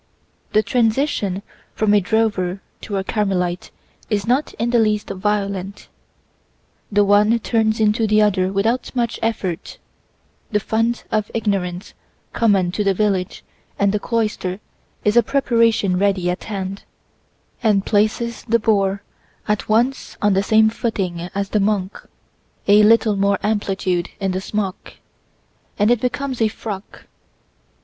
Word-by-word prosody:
The 215 - +4
transition 225 -5 0 0.3
from 215 -1 +2
a 205 - +5
drover 195 -2 0 0.2
to 200 - -4
a 190 - -1
Carmelite 185 -4 -1 0.4
is 205 -2 0
not 255 +5 +1
in 230 +2 -1
the 240 - +4
least 210 -2 +1
violent; 200 0 -3 1.0
the 205 0 +3
one 210 +3 +4
turns 220 -1 0
into 220 +1 +2
the 215 0 +3
other 190 -3 +2
without 225 +7 -1
much 235 -2 -1
effort; 200 -7 -3 0.7
the 210 - +1
fund 225 +3 -1
of 215 -1 0
ignorance 195 -4 -2 0.4
common 195 -6 +2
to 210 - -1
the 195 -1 +2
village 195 -3 -1 0.3
and 200 0 +2
the 210 - 0
cloister 210 -5 -2 0.5
is 210 +1 +3
a 240 - +7
preparation 230 -7 +2
ready 190 -3 +1
at 180 - -6
hand, 195 -2 -5 0.8
and 205 -4 +2
places 220 +2 0
the 235 0 +3
boor 200 -3 +1 0.4
at 210 0 -1
once 240 +5 0
on 205 -1 +2
the 190 - +2
same 220 +1 +4
footing 185 -7 -3
as 200 0 -2
the 210 - +1
monk: 200 -1 -1 0.6
a 205 +1 +7
little 220 0 +4
more 200 0 +2
amplitude 195 -4 -1
in 195 -2 -1
the 185 +1 -2
smock, 200 -2 -4 0.8
and 210 +2 +3
it 245 - +2
becomes 255 0 -2
a 220 - +4
frock. 210 -2 -7
210 Hz, 140 wpm, -20 LUFS, 195-225 Hz, 1.0 s, a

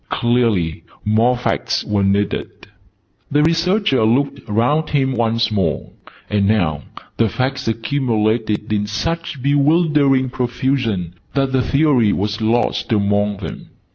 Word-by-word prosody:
Clearly 115 -9 0 0.2
more 115 +4 +2
Facts 120 - -1
were 105 -1 0
needed. 100 +1 0 0.8
The 145 +1 +2
Researcher 165 - +2
looked 130 +6 +1
round 135 +9 +1
him 135 -2 +1
once 115 -2 0
more: 100 -3 -1 0.4
and 100 -1 +1
now 85 -9 0 0.3
the 115 -1 +2
Facts 130 +4 -2
accumulated 110 -3 -1
in 105 0 0
such 165 +5 -3
bewildering 145 -2 +2
profusion, 120 -8 -1 0.2
that 135 -1 +1
the 130 -1 +2
Theory 135 -6 +2
was 105 +3 -2
lost 115 +2 0
among 100 -1 +1
them. 100 - -8
120 Hz, 120 wpm, -18 LUFS, 105-140 Hz, 0.8 s, more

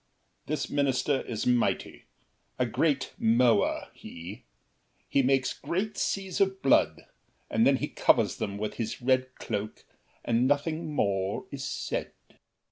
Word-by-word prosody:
This 155 +1 -1
minister 140 -1 +1
Is 110 -3 -4
mighty. 125 -1 0 0.5
A 125 - +2
great 135 +2 0
mower, 115 -1 +3
he! 95 +8 -10 0.6
He 140 - +3
makes 135 0 +2
Great 200 +5 -3
seas 190 -2 -1
of 190 -2 +1
blood, 135 - +3 0.5
and - - +4
then - - +5
he - - -2
covers - - +2
them 100 0 -3
With 105 +1 -3
his 115 - -3
red 130 0 +1
cloak 105 -2 -5 0.4
and 120 +2 +2
nothing 155 +3 0
more 100 -4 0
is 140 -2 -5
said. - - -3
130 Hz, 130 wpm, -28 LUFS, 115-145 Hz, 0.6 s, then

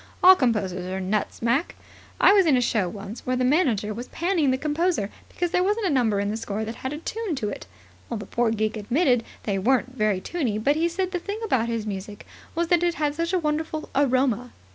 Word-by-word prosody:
"All 375 +1 +10
composers 205 - 0
are 190 +1 -3
nuts, 200 +4 -2
Mac. 240 +8 +1 0.4
I - - +7
was 390 -4 +5
in 275 -5 +5
a - - +3
show 220 -6 +1
once 205 +3 -8
where 255 - 0
the 255 0 +1
manager 250 - +2
was 240 +4 -6
panning 340 -4 0
the 260 - +2
composer 305 - 0 0.2
because 350 -1 -2
there 360 - +2
wasn't 415 +3 0
a 365 - +2
number 230 -7 +2
in 200 0 -1
the 220 - -2
score 220 -1 -3
that 225 +2 -6
had 260 - -4
a 295 - -4
tune 420 +2 -3
to 215 -6 -2
it. - - -7 0.4
The 215 -4 -4
poor 235 +3 0
geek 220 0 -1
admitted 245 - +2 0.2
they 200 -2 -1
weren't 255 +4 +1
very 215 -5 +1
tuney, 245 - -2
but 280 +7 +2
said 370 +2 -2
the 360 - -1
thing 405 +4 -5
about 240 - +1
his 230 -2 -2
music 205 0 -6 0.3
was 335 0 0
that 350 -2 +4
it 345 -1 +1
had 295 -1 0
such 335 +3 -2
a 375 - +2
wonderful 310 -1 -2
aroma. 255 -3 +1
255 Hz, 225 wpm, -25 LUFS, 215-330 Hz, 0.4 s, All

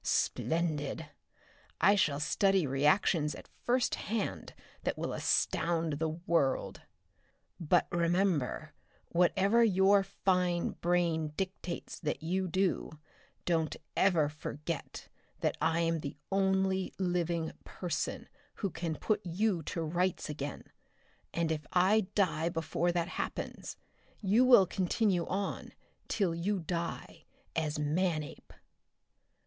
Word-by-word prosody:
Splendid! 160 -2 -1 0.7
I 195 +4 +6
shall 150 -8 +2
study 190 +4 +2
reactions 150 +3 +2
at - - -12 0.2
first 245 0 +2 0.2
hand 220 -1 -3 0.3
that - - -2
will - - -3
astound 165 -3 +1
the 160 0 0
world! 160 -4 0 0.8
"But 175 +1 +3
remember, 170 -4 +1 0.4
whatever 195 +6 +3
your 195 -1 +5
fine 180 -3 0
brain 165 -3 +1
dictates 190 -2 -4
that 155 -1 -3
you 185 +3 0
do, 185 -1 0 0.5
don't 165 -3 +1 0.2
ever 170 -6 +4
forget 150 +1 -6 0.3
that - - +1
I 165 +2 +2
am 165 -1 +1
the 145 -1 -6
only 190 -1 +1
living 175 -3 0
person 175 -4 -3 0.3
who 200 -4 -2
can 165 -1 -3
put 215 - -1
you 180 +1 0
to 165 - -3
rights 175 0 -1
again 145 -1 -5 0.7
and 170 -1 0
if 150 -2 -3
I 190 +3 +4
die 170 -4 +2
before 165 +1 0
that 170 -1 0
happens, - - -5 0.4
you 215 +5 +4
will 245 -7 +8
continue 185 0 0
on, 195 +1 -3 0.3
till 190 -6 +1
you 190 +5 -1
die, 170 0 -4 0.3
as 155 -2 -1
Manape!" 155 +1 -1
175 Hz, 115 wpm, -32 LUFS, 160-190 Hz, 0.8 s, will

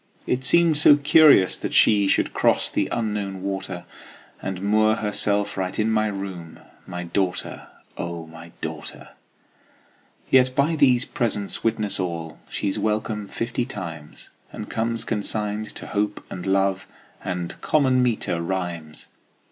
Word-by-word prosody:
It 125 +1 -1
seemed 165 +3 +4
so 145 - +8
curious 145 - +5
that - - -3
she 100 -2 +5
Should - - +1
cross - - +2
the - - 0
Unknown 105 -4 -2
water, 95 -2 -4 0.6
And 95 -1 -4
moor 110 +1 +3
herself 105 -1 0
right 95 -1 -2
in 110 +1 +1
my 110 -1 +2
room, 95 -5 -6 0.3
My 90 -1 -5
daughter, 90 +1 -2 0.3
O 85 -1 -4
my 80 +1 -12
daughter! - - -7 1.2
Yet 130 -1 +4
by 150 +4 +2
these 130 -4 +4
presents 110 -7 -2
witness 105 -3 0
all 85 -3 -4
She's 100 -2 -2
welcome 105 -1 -1
fifty 120 +4 -2
times, 85 -9 -8 0.2
And - - -7
comes 115 0 -1
consigned 105 0 -2
to - - -7
Hope 105 0 -2
and 90 +1 -6
Love 95 0 +1 0.4
And 90 -2 -4
common 130 -4 +3
meter 110 -8 0
rhymes. 85 -4 -4
105 Hz, 135 wpm, -23 LUFS, 90-115 Hz, 1.2 s, so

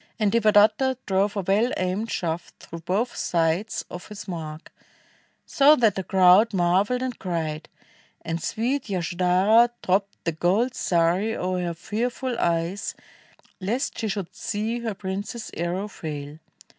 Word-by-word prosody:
And 210 -2 +2
Devadatta 215 +3 +4
drove 200 +1 +1
a - - +1
well 205 +7 +2
aimed 185 +5 -1
shaft 170 -1 -3
Through 170 - -9
both 200 +9 -1
sides 170 +5 0
of 180 - -9
his 210 -1 -9
mark, 160 -3 -7 0.7
so 295 -1 +5
that 225 -7 +3
the 190 - -4
crowd 190 +4 +5
Marveled 190 +8 +2
and 255 -2 -4
cried; 160 -4 -3 0.5
and 165 0 -3
sweet 240 - -2
Yasodhara 185 +5 +3
Dropped 195 +2 0
the 165 - 0
gold 195 +10 +1
sari 180 +5 +1
o'er 185 0 -1
her 170 - -2
fearful 240 +7 -3
eyes, 170 +3 -1 0.6
Lest 220 +8 -2
she 225 - -1
should 195 -3 -4
see 220 +3 -2
her 225 -3 -3
prince's 200 +4 -5
arrow 175 +4 -2
fail. 150 -5 -7
195 Hz, 140 wpm, -25 LUFS, 175-225 Hz, 0.7 s, so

